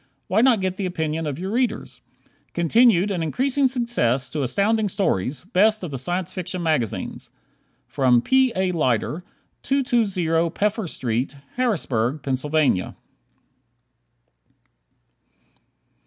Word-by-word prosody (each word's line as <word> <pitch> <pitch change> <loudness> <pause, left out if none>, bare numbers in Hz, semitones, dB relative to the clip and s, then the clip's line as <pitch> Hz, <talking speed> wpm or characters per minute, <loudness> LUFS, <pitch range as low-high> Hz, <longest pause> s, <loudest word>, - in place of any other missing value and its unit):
Why 200 +4 +2
not 240 -5 +4
get 185 0 -2
the 195 - -2
opinion 160 -2 -2
of 145 - -3
other 190 +3 -4
readers? 245 +1 -2 0.5
Continued 200 +3 +4
and 180 -4 -2
increasing 265 - +1
success 225 - 0
to 150 - -2
Astounding 205 - +1
Stories, 135 - -1
best 215 +2 +3
of 170 - -5
the 135 - -4
Science 175 +6 -2
Fiction 180 -1 -4
magazines! 155 - -2 0.9
P. 260 -1 +3
A. 185 -1 +1
Lyter, 150 0 0 0.4
220 200 -12 +1
Peffer 210 +3 -1
Street, 125 +2 -2 0.2
Harrisburg, 150 - -1
Pa. 140 -5 0
180 Hz, 110 wpm, -23 LUFS, 150-220 Hz, 0.9 s, not